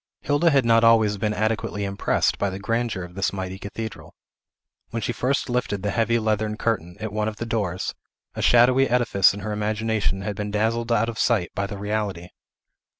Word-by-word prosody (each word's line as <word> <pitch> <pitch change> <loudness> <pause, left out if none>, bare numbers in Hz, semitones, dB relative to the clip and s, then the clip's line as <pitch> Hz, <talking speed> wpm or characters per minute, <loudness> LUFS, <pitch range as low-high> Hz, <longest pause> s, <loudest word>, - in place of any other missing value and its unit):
Hilda 145 +4 +2
had 135 -5 +3
not 115 0 +4
always 110 -3 +4
been 105 +1 0
adequately 105 -1 -1
impressed 100 0 0
by 100 - +1
the 95 - -5
grandeur 115 -1 -2
of 90 0 -10
this 100 +1 -1
mighty 95 -1 -5
cathedral. 110 +3 -7 0.7
When 115 - -3
she 115 +2 -2
first 130 +3 0
lifted 120 -6 -2
the 105 - 0
heavy 115 0 +1
leathern 110 -1 -1
curtain, 90 -8 -2
at 110 -1 -5
one 105 0 0
of 110 - -3
the 115 - -5
doors, 100 -6 -2 0.4
a - - -5
shadowy 125 +3 +5
edifice 115 -6 +4
in 100 - -7
her 105 +2 -4
imagination 105 -2 -1
had 100 +1 -3
been 105 +1 -4
dazzled 115 +3 0
out 115 0 +2
of 115 -1 -5
sight 110 -8 +1
by 100 0 -2
the 100 - -6
reality. 100 -4 -3
110 Hz, 195 wpm, -24 LUFS, 100-115 Hz, 0.7 s, shadowy